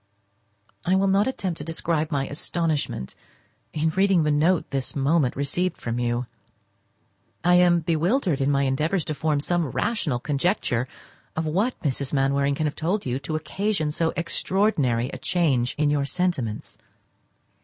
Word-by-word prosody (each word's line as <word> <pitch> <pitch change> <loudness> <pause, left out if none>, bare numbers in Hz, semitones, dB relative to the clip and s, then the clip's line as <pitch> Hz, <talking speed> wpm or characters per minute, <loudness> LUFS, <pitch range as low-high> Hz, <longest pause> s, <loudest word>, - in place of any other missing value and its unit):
I 185 - +2
will 195 +1 +3
not 195 +3 +3
attempt 190 -10 -3
to - - -5
describe 160 0 -1
my 135 -2 -1
astonishment 150 - -2 0.6
in 160 +1 0
reading 190 -1 +3
the 150 - +2
note 160 +4 +2
this 135 -2 -2
moment 140 -1 +2
received 165 +6 -1
from 115 0 -3
you. 120 +1 0 1.2
I 180 - +4
am 175 -1 +5
bewildered 170 - +1
in 135 - +2
my 140 -1 +2
endeavours 155 +6 0
to 155 - -2
form 150 0 0
some 175 +1 0
rational 145 - -1
conjecture 135 - 0 0.5
of 160 - -1
what 200 +11 0
Mrs. 140 -1 -2
Mainwaring 140 0 +2
can 155 - -1
have 150 - -1
told 185 +6 -1
you 130 +1 -1
to 155 +3 -4
occasion 155 +1 -1
so 165 +2 0
extraordinary 165 - +1
a - - -7
change 140 -9 +1
in 150 -1 +2
your 145 -1 +1
sentiments. 140 -9 -2
155 Hz, 155 wpm, -24 LUFS, 140-175 Hz, 1.2 s, am